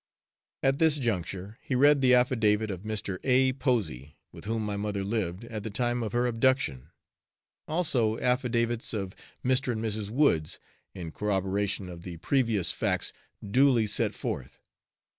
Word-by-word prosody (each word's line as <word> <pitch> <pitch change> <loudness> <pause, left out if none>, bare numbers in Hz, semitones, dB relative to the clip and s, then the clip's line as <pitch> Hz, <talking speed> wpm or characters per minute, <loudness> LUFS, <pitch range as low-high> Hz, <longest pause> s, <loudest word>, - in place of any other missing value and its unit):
At 135 0 +2
this 160 -2 +4
juncture 100 - -3
he 130 - -2
read 145 +2 +5
the 125 -1 +6
affidavit 110 -4 +2
of 90 -2 -6
Mr. 105 -3 -3
A. 130 0 +3
Posey, 115 - -2
with - - -12
whom 110 0 -2
my 105 -1 -2
mother 100 -1 -2
lived 100 -2 -2
at 115 -2 -6
the 110 - -5
time 120 +3 0
of 110 -3 -3
her 120 +2 +1
abduction; 115 - +1 0.8
also 130 -10 +1
affidavits 120 -2 0
of 95 -2 -4 0.3
Mr. 130 0 +2
and 110 0 -3
Mrs. 105 -1 -3
Woods, 110 - +1 0.4
in 85 -3 -6
corroboration 100 0 -1
of 85 -2 -9
the 85 -1 -8
previous 115 - +2
facts - - -1 0.3
duly 125 +1 +4
set 105 - 0
forth. - - -5
110 Hz, 150 wpm, -28 LUFS, 100-125 Hz, 0.8 s, the